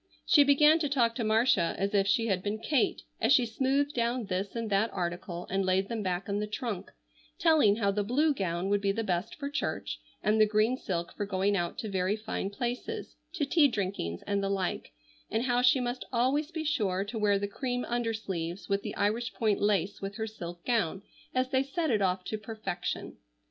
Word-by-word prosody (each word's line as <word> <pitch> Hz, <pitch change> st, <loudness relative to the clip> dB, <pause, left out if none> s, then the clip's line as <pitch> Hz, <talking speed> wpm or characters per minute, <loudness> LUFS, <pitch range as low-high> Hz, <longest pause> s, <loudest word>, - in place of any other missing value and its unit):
She 305 Hz, -6 st, +7 dB
began 300 Hz, +3 st, +5 dB
to 295 Hz, -3 st, 0 dB
talk 240 Hz, -5 st, +2 dB
to 235 Hz, -, -3 dB
Marcia 220 Hz, -5 st, +3 dB
as 195 Hz, +2 st, -1 dB
if 200 Hz, -1 st, +3 dB
she 225 Hz, +3 st, +2 dB
had 195 Hz, -5 st, 0 dB
been 205 Hz, +2 st, -2 dB
Kate, 240 Hz, +3 st, 0 dB, 0.2 s
as 225 Hz, -, +3 dB
she 250 Hz, -3 st, +6 dB
smoothed 270 Hz, +5 st, 0 dB
down 235 Hz, 0 st, 0 dB
this 195 Hz, +2 st, -3 dB
and 230 Hz, -1 st, -2 dB
that 200 Hz, +3 st, +2 dB
article 175 Hz, -1 st, -4 dB
and 195 Hz, +1 st, 0 dB
laid 190 Hz, +1 st, +1 dB
them 230 Hz, -2 st, -2 dB
back 185 Hz, -1 st, -2 dB
in 200 Hz, 0 st, -1 dB
the 210 Hz, -, -2 dB
trunk, 210 Hz, -3 st, -4 dB, 0.5 s
telling 310 Hz, -11 st, +5 dB
how 200 Hz, -3 st, +1 dB
the 205 Hz, +1 st, 0 dB
blue 290 Hz, +8 st, +2 dB
gown 180 Hz, -5 st, -2 dB
would 205 Hz, 0 st, +2 dB
be 200 Hz, -1 st, +2 dB
the 225 Hz, +3 st, -2 dB
best 180 Hz, -2 st, -2 dB
for 280 Hz, -, -5 dB
church 285 Hz, -, -3 dB, 0.2 s
and 215 Hz, +1 st, +3 dB
the 215 Hz, -, +6 dB
green 215 Hz, +4 st, +2 dB
silk 170 Hz, -8 st, -4 dB
for 205 Hz, -, -3 dB
going 195 Hz, +1 st, +1 dB
out 175 Hz, -3 st, -2 dB
to 220 Hz, -, -4 dB
very 190 Hz, 0 st, 0 dB
fine 215 Hz, -2 st, -3 dB
places, 240 Hz, +4 st, -4 dB, 0.2 s
to 325 Hz, -6 st, 0 dB
tea 290 Hz, +1 st, +5 dB
drinkings 190 Hz, -, -3 dB
and 200 Hz, -1 st, 0 dB
the 195 Hz, -, -1 dB
like, 195 Hz, -2 st, -2 dB, 0.4 s
and 225 Hz, +2 st, 0 dB
how 245 Hz, -1 st, +2 dB
she 255 Hz, +2 st, +5 dB
must 245 Hz, 0 st, -2 dB
always 265 Hz, +5 st, +1 dB
be 325 Hz, -2 st, -4 dB
sure 200 Hz, -11 st, 0 dB
to 220 Hz, +2 st, -5 dB
wear 205 Hz, -1 st, +3 dB
the 200 Hz, +1 st, -2 dB
cream 245 Hz, +4 st, -3 dB
undersleeves 215 Hz, -7 st, -3 dB
with 200 Hz, 0 st, 0 dB
the -, -, -5 dB
Irish 225 Hz, +4 st, 0 dB
point 215 Hz, -3 st, +1 dB
lace 200 Hz, -1 st, +1 dB
with 195 Hz, +1 st, -5 dB
her 220 Hz, -, -2 dB
silk 175 Hz, -5 st, -8 dB
gown 200 Hz, -6 st, 0 dB, 0.3 s
as 255 Hz, +1 st, +1 dB
they 260 Hz, -1 st, +3 dB
set 300 Hz, +3 st, -1 dB
it 215 Hz, -3 st, +2 dB
off 185 Hz, -1 st, +1 dB
to 215 Hz, +3 st, -4 dB
perfection. 215 Hz, -5 st, -5 dB
215 Hz, 210 wpm, -30 LUFS, 195-245 Hz, 0.5 s, She